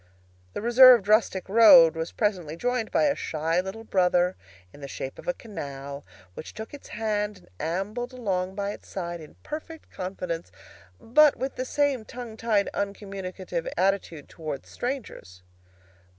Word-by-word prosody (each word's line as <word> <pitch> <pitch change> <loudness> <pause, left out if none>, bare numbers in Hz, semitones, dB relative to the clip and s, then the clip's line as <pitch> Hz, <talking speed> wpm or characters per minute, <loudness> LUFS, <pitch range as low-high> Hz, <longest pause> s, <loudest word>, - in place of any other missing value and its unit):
The - - -5
reserved 240 -3 +8
rustic 210 -3 +2
road 195 -6 +8
was 160 +1 -3
presently 180 -8 -1
joined 245 +1 -1
by - - +2
a 290 -2 +3
shy 165 +3 -1
little 190 +4 -7
brother 180 -3 +2 0.4
in 145 - -14
the 140 - -6
shape 135 0 -6
of - - -12
a 265 - +1
canal, 140 -9 -7 0.3
which 155 - -9
took 220 +4 -8
its 290 - -10
hand 210 -1 -2
and 185 - -21 0.3
ambled 225 +6 -4
along 190 -7 -2
by 200 0 -2
its - - -11
side 175 -3 -5
in 155 - -13
perfect 315 +1 -8
confidence, 180 - -5 0.5
but 295 +5 +5
with 265 +1 -4
the 255 - -3
same 280 -3 0
tongue 235 0 -8
tied, 220 -3 +1
uncommunicative 195 -3 -4
attitude 185 -5 0
towards 155 -4 -7
strangers. 240 - -6
200 Hz, 150 wpm, -26 LUFS, 175-235 Hz, 0.5 s, reserved